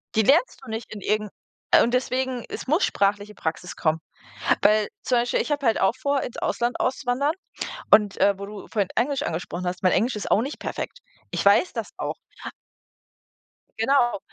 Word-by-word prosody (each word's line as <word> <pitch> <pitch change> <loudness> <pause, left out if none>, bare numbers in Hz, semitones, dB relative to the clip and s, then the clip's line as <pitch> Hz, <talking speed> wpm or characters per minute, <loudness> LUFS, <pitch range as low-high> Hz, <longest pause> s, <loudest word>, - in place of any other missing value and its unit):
Die 220 - +5
lernst 295 - +3
du - - -10
nicht 220 0 -5
in 210 - -8
irgend 210 +1 0 0.5
und 240 - 0
deswegen, 255 -1 0
es - - -6
muss 315 +8 +3
sprachliche 205 +1 0
Praxis 165 +2 -4
kommen. 160 -1 +1 0.6
Weil 210 0 +4
zum 250 - +2
Beispiel, 240 +1 +1
ich - - -1
habe 290 -1 -1
halt 225 - +3
auch 190 +3 +3
vor, 280 +1 +1
ins 245 - -6
Ausland 240 +1 -1
auszuwandern. 265 +2 +1 0.6
Und, 210 -1 +5
äh, 200 0 +4
wo 200 - -5
du 205 0 -9
vorhin 205 -3 0
Englisch 280 +2 +1
angesprochen 175 - -4
hast, 180 +1 -4
mein 185 - +5
Englisch 240 +3 +2
ist 210 - -4
auch 210 - +5
nicht 275 +5 -5
perfekt. - - -5 0.3
Ich - - -1
weiß 200 - +5
das - - -4
auch. - - -3 1.7
Genau. 240 -2 +3
220 Hz, 180 wpm, -24 LUFS, 200-260 Hz, 1.7 s, Die